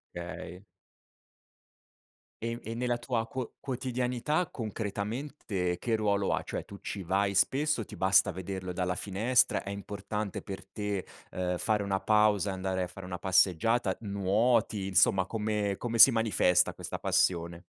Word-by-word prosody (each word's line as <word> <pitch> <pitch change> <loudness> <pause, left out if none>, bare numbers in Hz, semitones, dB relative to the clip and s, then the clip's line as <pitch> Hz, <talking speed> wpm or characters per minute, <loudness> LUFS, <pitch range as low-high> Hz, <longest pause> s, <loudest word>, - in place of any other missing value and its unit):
Okay. 85 +1 -7 1.8
E, 115 +1 -3
e, 115 - -5
nella 120 0 -1
tua 120 -2 -2
quo 130 0 -5
quotidianità 125 +5 -1
concretamente 105 -3 -3
che 115 +3 0
ruolo 100 -2 +1
ha? - - 0
Cioè - - -5
tu 100 - -11
ci 100 -2 -5
vai 100 +3 +1
spesso, 135 +3 +2
ti - - -10
basta 95 0 +4
vederlo 95 0 -5
dalla 90 0 -1
finestra, 105 +6 +2
è - - -7
importante 100 +1 -4
per 95 -1 -8
te, 105 -3 -4 0.2
ehm, 90 -1 -2
fare 105 -2 +1
una 100 -1 0
pausa, 105 -2 +3
e - - -2
andare 95 0 -2
a 90 - -3
fare 95 +1 -10
una 90 -1 -5
passeggiata, 95 +3 +2
nuoti, 100 +1 +1
insomma 95 0 +3
come 105 -2 -1
come 115 -1 -3
si 135 - +11
manifesta, 105 -6 +3
questa - - -6
passione? 85 -1 +1
100 Hz, 145 wpm, -30 LUFS, 95-115 Hz, 1.8 s, si